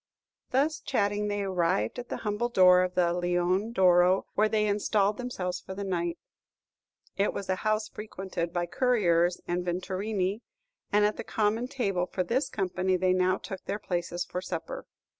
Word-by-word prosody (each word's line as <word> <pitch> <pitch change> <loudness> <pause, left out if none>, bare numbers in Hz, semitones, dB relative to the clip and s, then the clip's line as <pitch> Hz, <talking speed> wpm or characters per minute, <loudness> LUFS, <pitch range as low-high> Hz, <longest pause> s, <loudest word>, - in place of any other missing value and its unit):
Thus 290 +5 +1
chatting, 205 +1 0
they 205 0 -1
arrived 175 - 0
at 245 - -8
the - - -3
humble 210 +3 0
door 180 -5 +6
of 185 0 -1
the 175 -1 +3
"Leone 175 +4 0
d'Oro," 180 -2 +4
where 215 +1 +3
they 215 -1 +2
installed 205 0 +1
themselves 185 -8 -3
for 190 - -8
the 200 - -4
night. 175 -3 -2 1.0
It 200 +1 +1
was 200 - -5
a 185 - +1
house 215 +1 0
frequented 190 -5 -5
by 175 0 -1
couriers 175 -5 +2
and 175 +1 -1
vetturini, 190 +3 -2 0.5
and 210 0 +4
at 210 - 0
the - - -4
common 220 +3 0
table 195 -9 -1
for 185 - -2
this 245 +10 0
company 185 -1 0
they 185 0 +2
now 185 0 +2
took 190 - -8
their 200 - -2
places 175 -3 -3
for 180 - -4
supper. 165 -3 -5
190 Hz, 170 wpm, -28 LUFS, 180-210 Hz, 1.0 s, door